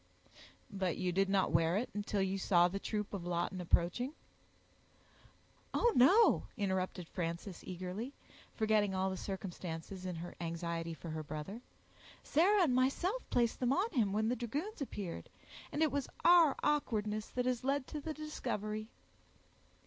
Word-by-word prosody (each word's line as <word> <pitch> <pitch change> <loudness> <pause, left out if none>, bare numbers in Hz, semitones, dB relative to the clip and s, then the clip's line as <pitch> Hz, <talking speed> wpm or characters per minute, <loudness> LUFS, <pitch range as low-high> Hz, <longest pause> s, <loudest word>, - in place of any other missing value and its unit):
"But 190 -3 -1
you 185 -1 0
did 195 +2 +2
not 195 -1 +2
wear 165 +2 +3
it, 240 - -2
until 205 -1 -1
you 190 +1 -1
saw 175 -2 +5
the 195 +3 -3
troop 210 0 -3
of 195 -4 -3
Lawton 175 +1 -2
approaching?" 180 - +1 1.6
"Oh! 475 -1 +4
no," 385 - +6
interrupted 190 -3 -1
Frances, 170 +2 -4
eagerly, 185 +7 -5 0.4
forgetting 215 -3 +2
all 190 0 +1
the - - -3
circumstances 185 -1 -5
in 180 - -3
her 170 +2 -6
anxiety 170 0 -3
for 165 0 -7
her 155 0 -3
brother. 155 +9 -6 0.6
"Sarah 375 +6 +4
and 285 -7 +2
myself 310 - +1
placed 235 -1 +1
them 255 +1 +2
on 395 +9 +1
him 230 - +2
when 215 +2 +1
the 245 - +1
dragoons 285 - -4
appeared; 200 -10 -5 0.4
and 305 - +1
it 310 - +2
was 280 -1 -2 0.2
our 340 -4 +7
awkwardness 215 -8 0
that 250 0 -2
has 250 -1 0
led 275 0 +1
to 300 - -6
the 310 +1 -4
discovery." 215 -8 -3
205 Hz, 155 wpm, -35 LUFS, 180-260 Hz, 1.6 s, our